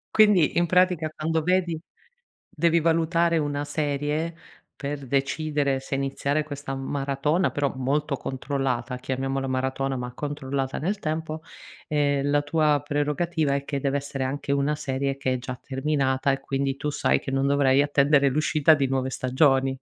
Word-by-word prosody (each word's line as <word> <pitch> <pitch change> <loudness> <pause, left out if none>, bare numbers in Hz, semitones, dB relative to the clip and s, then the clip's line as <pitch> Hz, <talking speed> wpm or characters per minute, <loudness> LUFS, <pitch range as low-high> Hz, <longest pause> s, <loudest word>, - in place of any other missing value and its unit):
Quindi 205 -8 +5
in 175 - +4
pratica 180 -2 +2
quando 160 0 -1
vedi 180 -3 +1 0.7
devi 170 +1 +2
valutare 165 +1 +2
una 145 -1 -1
serie, 150 +2 -2 0.4
per 140 -1 -4
decidere 140 0 0
se 135 - -4
iniziare 140 +2 -1
questa 145 -2 -6
maratona, 140 +5 0
però 145 -1 -1
molto 140 +3 0
controllata, 130 -2 -2
chiamiamola 135 +1 -2
maratona 130 +1 -1
ma 125 0 -5
controllata 140 -2 -3
nel 195 +6 -1
tempo, 155 -1 -3 0.5
ehm, 145 -1 +1
la 145 0 +3
tua 150 -1 +2
prerogativa 145 0 0
è 140 0 -3
che 140 -2 -3
deve 140 0 +1
essere 140 -1 -4
anche 140 +1 -2
una 140 +2 +1
serie 135 0 -2
che 130 -1 0
è - - 0
già 125 0 -7
terminata 135 -1 0
e, 135 - -1
quindi, 135 0 -2
tu 150 +1 -2
sai - - +2
che - - -7
non 135 0 +1
dovrai 140 -1 +4
attendere 140 -1 +3
l'uscita 155 +2 +3
di 140 -3 +1
nuove 130 0 -1
stagioni? 135 0 +2
140 Hz, 155 wpm, -25 LUFS, 135-155 Hz, 0.7 s, Quindi